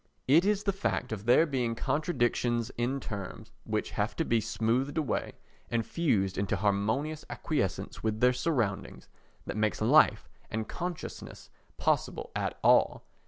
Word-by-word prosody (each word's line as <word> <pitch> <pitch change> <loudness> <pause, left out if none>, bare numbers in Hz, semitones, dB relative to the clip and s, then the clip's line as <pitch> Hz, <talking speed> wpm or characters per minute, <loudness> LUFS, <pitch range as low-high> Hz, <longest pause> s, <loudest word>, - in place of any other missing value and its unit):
It 160 +7 +5
is 205 0 +1
the 200 - +1
fact 190 - -2
of 110 -1 -5
there 125 +7 +6
being 125 -6 -1
contradictions 120 -4 0
in 125 +3 -1
terms, 100 -6 -7
which - - -2
have - - -1
to - - 0
be 115 -1 +2
smoothed 125 +8 0
away 150 -7 -1 0.4
and 115 -2 0
fused 100 - 0
into 100 +2 0
harmonious 110 - 0
acquiescence 120 - -2
with 110 -1 -1
their 125 +2 +5
surroundings, 125 -7 -2 0.4
that - - -4
makes 110 0 +1
life - - +4 0.2
and 110 0 -3
consciousness 175 -1 -6 0.3
possible - - 0
at - - -2
all. - - +4
120 Hz, 145 wpm, -30 LUFS, 110-150 Hz, 0.4 s, there